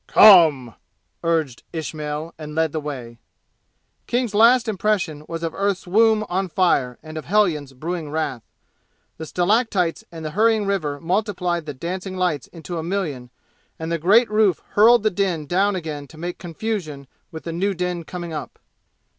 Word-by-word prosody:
"Come!" 155 - +7 0.5
urged 160 -7 0
Ismail, 155 0 -4
and 150 -1 -7
led 160 -1 +1
the 155 - -2
way. 125 -6 -7 0.9
King's 245 -3 -1
last 230 +3 +5
impression 190 -7 -1
was 165 0 -5
of 165 -1 -2
earth's 200 -1 -1
womb 215 +3 +3
on 185 +1 -1
fire 140 -9 +1
and 155 0 -7
of - - -10
hellions 165 -9 +1
brewing 160 +3 -4
wrath. 150 -5 -2 0.8
The 160 - -7
stalactites 185 -1 +1
and 165 -2 -8
the 155 - -3
hurrying 220 +2 +2
river 155 -8 -1
multiplied 180 -2 -1
the 145 - -5
dancing 185 +6 -5
lights 175 -8 -1
into 170 0 -7
a - - -4
million, 160 -9 -3 0.5
and 160 +1 -5
the 170 - 0
great 210 +7 +4
roof 210 -5 +2
hurled 230 +2 +5
the 215 - +2
din 175 -5 -1
down 195 +6 +1
again 155 -5 -5
to 155 - -15
make 175 +2 -5
confusion 170 -5 -4 0.3
with 160 - -8
the 165 - -5
new 195 +3 0
din 180 -1 -2
coming 170 0 -7
up. 150 -4 -6
170 Hz, 165 wpm, -22 LUFS, 155-200 Hz, 0.9 s, Come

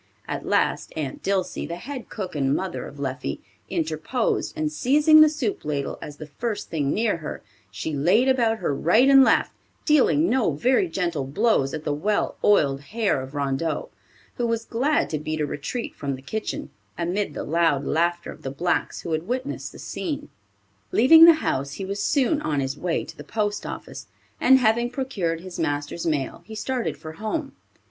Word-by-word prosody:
At - - -4
last - - +1
Aunt 145 -4 -4
Dilsey, 190 -1 -1
the 170 - -4
head 260 +7 -7
cook 185 -5 -5
and 135 -1 +1
mother 190 -2 -3
of 145 - -12
Leffie, 130 - -3 0.3
interposed, 160 +10 -1
and 155 -1 -1
seizing 295 - +5
the 310 - +8
soup 280 -9 -3
ladle 145 -2 -3
as 145 -1 -8
the 155 - -7
first 210 +8 -4
thing 145 -4 0
near 220 -4 +1
her, 155 -2 -7 0.3
she 150 +10 -5
laid 180 - +3
about 235 -4 +3
her 175 -8 -1
right 195 - +4
and 270 -1 +8
left, - - +3 0.3
dealing 300 +1 +4
no 250 - +2
very 255 - +2
gentle 175 - -2
blows 155 - +2
at 155 - -5
the 150 - -1
well 205 +8 0
oiled 140 -9 +3
hair 210 - -1
of 135 +2 -9
Rondeau, 140 +3 -1 0.5
who 240 - 0
was 230 0 -1
glad 280 +6 +1
to 155 - -1
beat 155 +1 -3
a 150 - +1
retreat 150 - -4
from 140 -2 -3
the 130 - -13
kitchen, 220 +9 -4 0.3
amid 175 -1 -2
the - - -3
loud 160 -3 +1
laughter 170 +2 0
of - - -13
the 135 - -4
blacks 170 +6 -1
who 170 - -5
had 160 +2 -2
witnessed 255 +4 -3
the - - -13
scene. 295 -3 -5 0.6
Leaving 320 +8 +8
the 335 -1 +9
house 140 +1 -1
he 195 - -5
was 200 +1 -3
soon 290 +5 +2
on 150 - -1
his 135 0 -2
way 170 +2 -1
to - - -11
the - - -10
post 210 -1 -2
office, - - -8 0.3
and 265 +1 +6
having 235 0 +2
procured 200 -11 -2
his 185 -1 -8
master's 145 +2 -2
mail 145 -5 -1
he 220 - -8
started 250 +2 -2
for 155 - -8
home. 245 - -3
180 Hz, 185 wpm, -24 LUFS, 150-240 Hz, 0.6 s, the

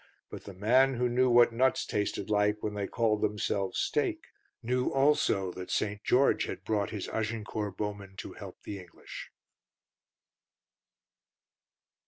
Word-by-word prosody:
But - - -8
the 100 - -9
man 130 +7 +4
who 125 +1 +1
knew 125 +1 +2
what 120 -1 +6
nuts 130 +3 +2
tasted 105 -1 -2
like 105 0 +1
when 105 - -2
they 100 -1 -3
called 110 -3 +1
themselves 100 -2 -1
steak - - -1 0.3
knew 125 +2 +1
also 135 -9 +2
that 90 +1 -8
St. 105 0 -1
George 135 +3 +3
had - - -6
brought 105 -2 0
his 105 - -5
Agincourt 110 -2 -3
Bowmen 100 -2 -5
to - - -7
help - - -11
the 100 -1 -6
English. 90 -2 -10
105 Hz, 140 wpm, -30 LUFS, 100-120 Hz, 0.3 s, what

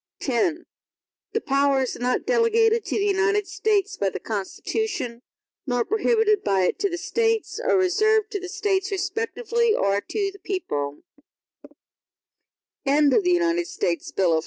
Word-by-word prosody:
X 290 +6 0 0.8
The 450 - 0
powers 275 -1 +1
not 250 +1 0
delegated 460 -1 +3
to - - -2
the 405 - +1
United 410 +1 +2
States 410 -1 0
by 200 - +1
the - - -6
Constitution, 240 - -3 0.5
nor 245 -2 0
prohibited 435 -1 +2
by 195 -1 +2
it 180 - 0
to 400 0 +1
the 350 - -3
States, 450 +4 -1
are - - +2
reserved 430 +4 +2
to 410 - -2
the 370 -1 -7
States 395 -1 0
respectively, 450 +4 0
or 200 +1 +1
to 400 - -2
the 400 - -15
people. 145 - -4
395 Hz, 120 wpm, -24 LUFS, 270-440 Hz, 0.8 s, delegated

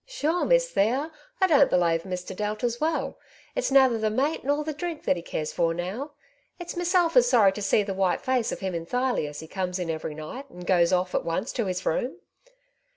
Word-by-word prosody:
" - - -49
Sure, 325 +4 +1
Miss - - +3
Thea, 260 +10 +1 0.3
I 380 - +5
don't 290 -6 +5
belave 170 -1 +2
Mr. 180 0 -5
Delta's 215 +4 -2
well; 315 +1 -1 0.3
it's - - -1
nather 265 -4 +5
the 215 0 +1
mate 270 +8 0
nor 290 +2 0
the 310 0 -3
dhrink 325 +1 -5
that - - +2
he 170 - -5
cares 155 -2 -4
for 165 -1 +1
now. 210 - -4 0.4
It's 350 -1 -7
meself 350 -2 +2
is 245 -1 +6
sorry 220 -6 +5
to 210 - -7
see 205 +1 +3
the 195 -1 -3
white 190 -1 +1
face 255 -3 0
of - - -5
him 190 -1 -2
enthirely 205 - -1
as 150 - -8
he 160 - -10
comes 185 +1 -3
in 175 -3 -2
every 155 -1 -5
night, 245 - -8
and 180 0 -10
goes 175 -1 +3
off 180 0 +1
at - - 0
once 175 +8 -2
to 230 -5 -1
his 185 0 -3
room. 245 +10 -1
215 Hz, 220 wpm, -26 LUFS, 180-285 Hz, 0.4 s, is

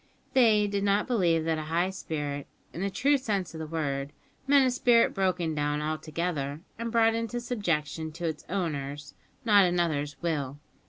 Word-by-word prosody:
They 225 -5 +5
did 200 -1 -1
not 200 +1 +2
believe 170 -9 +2
that 160 -1 0
a 155 - -5
high 175 +3 +1
spirit, 145 -6 -4 0.3
in 170 - -5
the 200 - 0
true 280 +8 +2
sense 200 -9 -2
of 160 - -7
the 160 - -5
word, 145 -3 -2 0.3
meant 280 -1 +6
a 255 - +2
spirit 245 -2 +4
broken 180 -4 0
down 145 0 0
altogether 155 -1 -3 0.2
and 230 0 -3
brought 225 -1 +4
into 230 +1 -2
subjection 165 - -2
to 170 +1 -5
its 160 -2 -3
owner's, 145 -6 -3 0.3
not 205 -3 +6
another's, 160 -5 0
will. 145 -5 -2
170 Hz, 170 wpm, -28 LUFS, 150-210 Hz, 0.3 s, meant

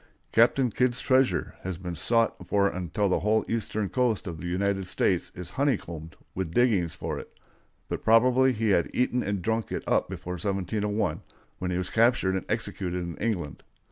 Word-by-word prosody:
"Captain 120 +2 +4
Kidd's 125 +2 +1
treasure" 130 -1 +2
has 95 -2 -4
been 90 -1 -5
sought 115 +6 +2
for 100 -1 +3
until 95 +2 -1
the 90 - +2
whole 110 +2 +2
eastern 110 -2 -1
coast 115 +1 0
of 85 -4 -6
the 90 - -4
United 95 +1 0
States 90 -1 +1
is 90 -1 -7
honeycombed 85 - -2 0.2
with 90 -3 -4
diggings 105 -10 +2
for - - -4
it; - - -11 0.6
but - - -4
probably 125 +4 +5
he 110 -2 0
had 85 -4 +3
eaten 125 0 +1
and 100 -3 -2
drunk 110 +2 -1
it - - -3
up - - +1
before 90 - -5
1701, 105 +1 -1 0.4
when 90 - -2
he 90 - -1
was 90 0 -3
captured 115 -5 +3
and 95 - -3
executed 90 -2 -2
in 85 -1 -5
England. 95 -10 -2
100 Hz, 175 wpm, -27 LUFS, 90-115 Hz, 0.6 s, probably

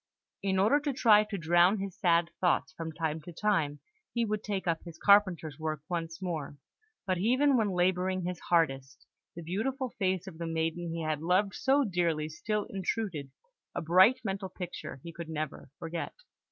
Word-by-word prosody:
In 190 -1 0
order 215 +10 +4
to 290 -1 -2
try 215 -5 +6
to 210 -1 -4
drown 175 +4 +4
his 195 -2 -5
sad 170 -1 +2
thoughts, 175 -3 +1
from 160 0 -5
time 160 -1 -2
to 175 - -10
time 165 -6 0 0.3
he 235 -1 0
would 215 -1 -2
take 200 -2 -3
up 165 -1 0
his 170 -2 -10
carpenter's 185 -7 +3
work 155 -2 -3
once 165 -2 -3
more; 155 -5 -4 0.5
but 185 -2 0
even 260 +7 +3
when 220 -4 +2
labouring 185 0 +1
his 180 0 -3
hardest, 135 -6 +1 0.3
the 170 - -7
beautiful 250 - -2
face 185 -2 0
of 170 -4 -10
the 170 - -3
maiden 165 +1 -2
he 165 0 -3
had 155 -1 -1
loved 185 +4 +2
so 275 +2 +3
dearly 170 - 0
still 210 +6 -2
intruded, 190 -6 -3 0.5
a - - -1
bright 185 +9 +6
mental 195 -2 -3
picture 180 -6 -7
he 170 - -8
could 170 -1 -7
never 155 -3 -5
forget. 165 0 -5
180 Hz, 180 wpm, -30 LUFS, 165-200 Hz, 0.5 s, try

